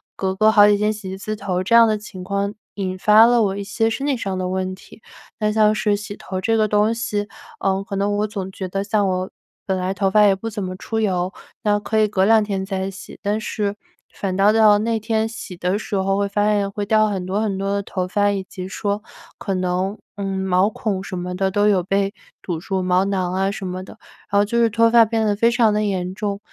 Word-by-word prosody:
隔 190 -1 -2
个 215 +2 +4
好 205 -1 +7
几 205 0 +4
天 210 +1 +1
洗 210 -3 -8
一 190 - -6
次 215 +2 -4
头 185 -3 -2
这 210 - -1
样 230 0 +8
的 215 -1 +1
情 205 -3 -10
况 200 +2 -2 0.2
引 185 -2 -3
发 215 +3 +6
了 240 0 +4
我 200 -2 0
一 200 - -4
些 225 +3 0
身 225 +5 -3
体 280 - +2
上 195 -5 -3
的 185 0 -2
问 185 0 -2
题。 200 - -17 0.4
那 210 -1 +1
像 215 0 +4
是 210 -1 +1
洗 205 0 -7
头 190 -2 -5
这 225 +4 +1
个 215 -1 +2
东 210 +2 +2
西， 210 -3 -2 0.3
呃， 195 0 0
可 200 -1 -6
能 200 +1 0
我 210 +1 0
总 195 -2 -5
觉 190 0 -5
得 195 +2 -2
像 205 0 +1
我 185 0 -2 0.4
本 190 -1 -1
来 185 +1 -1
头 195 0 0
发 210 +2 +5
也 200 - +5
不 210 +4 -5
怎 205 -2 -5
么 185 0 -4
出 225 +2 -3
油， 185 -3 0 0.3
那 205 -1 +3
可 220 +1 -1
以 215 - +4
隔 195 -2 +1
两 220 +1 +5
天 195 -2 -3
再 190 -1 -3
洗， 190 0 -11
但 210 +1 -1
是 205 -2 -2 0.4
反 190 -2 -3
倒 200 +2 +5
到 215 -2 +6
那 225 +1 0
天 220 0 0
洗 215 -5 -8
的 180 +3 0
时 215 - -5
候 195 0 +1
会 200 0 +1
发 205 +1 +1
现 205 -2 +1
会 205 0 -3
掉 215 +1 +3
很 190 -3 -3
多 195 +3 -1
很 205 -3 -1
多 195 +1 -2
的 200 0 -1
头 185 -1 -3
发， 205 +2 +1
以 195 -1 -2
及 185 -1 -8
说 205 +1 -2 0.3
可 195 - -3
能， 185 +2 -1 0.2
嗯， 195 -1 -3
毛 190 +1 +2
孔 205 -3 -3
什 185 - -6
么 180 +1 -4
的 190 +1 0
都 205 +2 +2
有 195 -4 +3
被 195 +2 0 0.3
堵 170 -3 -4
住， 190 +2 -2
毛 180 0 +2
囊 185 -2 -1
啊 195 +1 0
什 195 -1 -5
么 185 +1 -5
的， 205 - -13 0.3
然 200 - +3
后 205 - +4
就 235 +3 -2
是 230 - +4
脱 230 +1 +3
发 230 0 +7
变 220 0 0
得 205 -1 +1
非 230 +3 +3
常 235 -3 +3
的 210 0 +1
严 185 -3 -2
重。 200 -1 -3
200 Hz, 270 characters per minute, -21 LUFS, 190-215 Hz, 0.4 s, 样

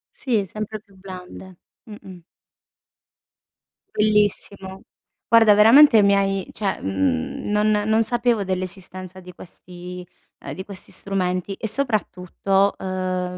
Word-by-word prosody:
Sì, 225 -7 -1
sempre 215 +3 -6
più 200 -2 -25
blande. 185 -1 -11 0.3
Mh-mh. 190 -5 -12 1.7
Bellissimo. 205 -2 0 0.5
Guarda, 225 -2 +6
veramente 225 +3 +7
mi 200 0 +4
hai 195 -1 -1
cioè, 200 -3 -3
mhmm, 95 -4 -2
non 210 +1 +2 0.2
non 220 +1 +2
sapevo 235 -2 0
dell'esistenza 185 0 -6
di 180 0 -13
questi 180 +1 -11 0.4
uhm, - - -5
di 190 - -7
questi 200 -2 -11
strumenti, 185 -1 -2
e 220 - -5
soprattutto, 200 -4 0
uhm, 185 -1 -3
195 Hz, 110 wpm, -22 LUFS, 185-210 Hz, 1.7 s, veramente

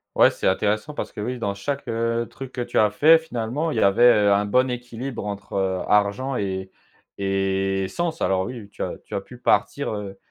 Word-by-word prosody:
Ouais, - - +6
c'est - - -2
intéressant 105 +8 0
parce - - -4
que, 105 - -7
oui, 125 +3 -3
dans 100 -4 -2
chaque, 140 +8 -4
heu, 115 +1 -1
truc 135 -1 -9
que 125 - -4
tu - - 0
as 105 -1 +5
fait 160 +9 +6
finalement, 145 +1 -3
il - - -3
y - - +2
avait, 100 +4 +3 0.2
heu, 100 - +5
un 100 +1 +2
bon 125 +5 +3
équilibre 120 -1 -5
entre, 100 -1 -6
heu, 95 -1 0
argent 105 +6 +2
et 95 -2 -3 0.5
et 95 0 0
sens. 165 - -3
Alors, 95 0 +1
oui, 120 -5 -7
tu - - -11
as - - -3
tu - - -13
as 100 - -1
pu 125 +5 -13
partir, 140 +2 +1
heu, 100 -2 -6
105 Hz, 215 wpm, -23 LUFS, 100-125 Hz, 0.5 s, Ouais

